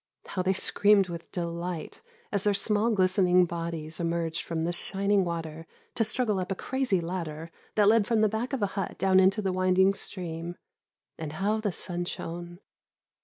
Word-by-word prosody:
How 185 Hz, -, -3 dB
they 185 Hz, +1 st, +2 dB
screamed 200 Hz, 0 st, +4 dB
with 170 Hz, -1 st, -7 dB
delight 170 Hz, -1 st, -4 dB, 0.3 s
as 200 Hz, -2 st, 0 dB
their 205 Hz, -1 st, +2 dB
small 210 Hz, +2 st, +2 dB
glistening 185 Hz, -3 st, +4 dB
bodies 165 Hz, -2 st, -5 dB
emerged 165 Hz, -1 st, -1 dB
from 165 Hz, -1 st, -3 dB
the 170 Hz, -, 0 dB
shining 195 Hz, +3 st, 0 dB
water 165 Hz, -2 st, -5 dB, 0.3 s
to 230 Hz, -, +2 dB
struggle 220 Hz, -2 st, +1 dB
up 185 Hz, +1 st, -3 dB
a -, -, 0 dB
crazy 260 Hz, -4 st, 0 dB
ladder 165 Hz, -2 st, -5 dB, 0.2 s
that 210 Hz, -1 st, +4 dB
led 215 Hz, -1 st, +5 dB
from 230 Hz, -2 st, +2 dB
the 215 Hz, -, +5 dB
back 220 Hz, +4 st, -2 dB
of 265 Hz, -6 st, -1 dB
a 200 Hz, -, -1 dB
hut 195 Hz, -2 st, -3 dB
down 190 Hz, 0 st, +4 dB
into 190 Hz, +3 st, +3 dB
the 190 Hz, -1 st, 0 dB
winding 185 Hz, +1 st, +3 dB
stream; 175 Hz, -3 st, -5 dB, 0.6 s
and 155 Hz, -2 st, -5 dB
how 205 Hz, +6 st, 0 dB
the 210 Hz, -2 st, 0 dB
sun 175 Hz, 0 st, -3 dB
shone! 175 Hz, 0 st, -6 dB
185 Hz, 175 wpm, -28 LUFS, 170-205 Hz, 0.6 s, led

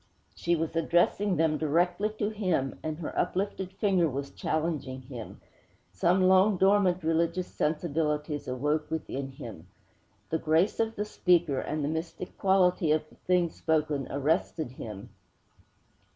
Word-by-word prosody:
_" -, -, -36 dB, 0.3 s
She 170 Hz, 0 st, 0 dB
was 165 Hz, 0 st, -3 dB
addressing 175 Hz, +4 st, +2 dB
them 155 Hz, -1 st, +1 dB
directly 175 Hz, +6 st, +1 dB
to 205 Hz, -, 0 dB
him, 180 Hz, -11 st, -1 dB
and 155 Hz, -1 st, -3 dB
her 160 Hz, -, -6 dB
uplifted 190 Hz, -1 st, -1 dB
finger 190 Hz, -5 st, +2 dB
was 140 Hz, +1 st, -4 dB
challenging 150 Hz, -5 st, -2 dB
him. 125 Hz, -4 st, -9 dB, 0.5 s
Some 175 Hz, -, +2 dB
long 190 Hz, +2 st, +5 dB
dormant 190 Hz, -2 st, +3 dB
religious 165 Hz, +3 st, +1 dB
sensibilities 150 Hz, -2 st, -1 dB
awoke 150 Hz, +4 st, -1 dB
within 140 Hz, -4 st, -4 dB
him. 110 Hz, -10 st, -9 dB, 0.6 s
The 160 Hz, -, +1 dB
grace 160 Hz, +5 st, +2 dB
of 225 Hz, 0 st, 0 dB
the 210 Hz, -, -2 dB
speaker, 175 Hz, -8 st, +2 dB
and 155 Hz, -1 st, -3 dB
the -, -, 0 dB
mystic 160 Hz, +3 st, -4 dB
quality 185 Hz, -4 st, +3 dB
of 155 Hz, 0 st, +1 dB
the -, -, -19 dB
thing 180 Hz, -2 st, +1 dB
spoken, 150 Hz, -4 st, 0 dB
arrested 150 Hz, 0 st, 0 dB
him.' 105 Hz, -6 st, -8 dB
160 Hz, 140 wpm, -29 LUFS, 150-180 Hz, 0.6 s, long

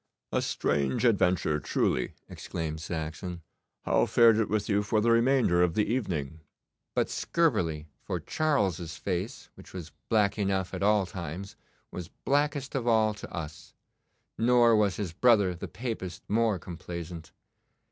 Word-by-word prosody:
'A -, -, +1 dB
strange 70 Hz, -, 0 dB
adventure 90 Hz, -8 st, +2 dB
truly,' -, -, 0 dB
exclaimed 80 Hz, -1 st, -5 dB
Saxon. 80 Hz, +2 st, -5 dB, 0.4 s
'How -, -, +2 dB
fared 115 Hz, -2 st, +6 dB
it 110 Hz, -, +1 dB
with 105 Hz, -1 st, 0 dB
you 100 Hz, -1 st, +2 dB
for 105 Hz, +1 st, +1 dB
the 115 Hz, +2 st, +3 dB
remainder 115 Hz, -6 st, +3 dB
of 90 Hz, -2 st, +2 dB
the 105 Hz, -, +2 dB
evening?' 80 Hz, -, -2 dB, 0.6 s
'But -, -, +2 dB
scurvily, 90 Hz, -, 0 dB, 0.2 s
for -, -, -3 dB
Charles's 95 Hz, -, -1 dB
face, 95 Hz, +6 st, -4 dB
which -, -, -15 dB
was 85 Hz, -4 st, -7 dB, 0.2 s
black 105 Hz, -2 st, +2 dB
enough 95 Hz, -2 st, 0 dB
at -, -, -4 dB
all 105 Hz, -1 st, +3 dB
times, 90 Hz, +2 st, -7 dB, 0.4 s
was 90 Hz, -2 st, -6 dB
blackest 145 Hz, -, -1 dB
of 125 Hz, -3 st, -2 dB
all 110 Hz, -2 st, +3 dB
to 105 Hz, -, -10 dB
us; 80 Hz, -3 st, -7 dB, 0.6 s
nor 120 Hz, 0 st, +5 dB
was 105 Hz, -3 st, +2 dB
his 95 Hz, -6 st, -4 dB
brother 105 Hz, -3 st, +4 dB
the 85 Hz, -, -7 dB
Papist 110 Hz, -7 st, -6 dB
more 110 Hz, -1 st, +2 dB
complaisant. 85 Hz, -1 st, -8 dB
100 Hz, 145 wpm, -28 LUFS, 85-115 Hz, 0.6 s, fared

